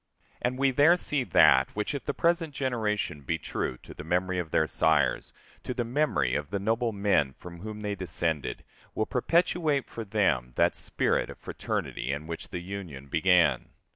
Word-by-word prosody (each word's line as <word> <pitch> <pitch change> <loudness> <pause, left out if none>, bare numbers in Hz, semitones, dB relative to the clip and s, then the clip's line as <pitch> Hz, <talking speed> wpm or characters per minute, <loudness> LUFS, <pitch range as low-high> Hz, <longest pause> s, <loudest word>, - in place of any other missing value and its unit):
And 125 +1 -1
we 135 0 +3
there 145 +7 +5
see 150 -6 0
that 65 - +5
which, 105 +5 -2
if 140 - -5
the 145 - -1
present 165 -3 +1
generation 110 - -1
be 80 +4 -2
true 65 -4 -3
to - - -11
the - - -9
memory 90 +3 0
of 85 -3 -4
their 80 - +2
sires, 75 -5 +1 0.3
to 125 - -4
the 120 - 0
memory 115 - +1
of 75 +1 -2
the 100 - -1
noble 115 +4 0
men 100 -10 +1
from 85 +3 -11
whom 105 +2 -7
they 105 -1 -2
descended, 85 -5 -2 0.3
will 110 - +1
perpetuate 155 +2 +1
for 115 - -6
them 90 - 0
that - - +3
spirit - - 0
of - - -9
fraternity 65 - -3
in 70 +2 -4
which 85 0 -6
the 90 - -5
Union 90 -8 -7
began. 90 +2 +3
100 Hz, 180 wpm, -28 LUFS, 80-125 Hz, 0.3 s, there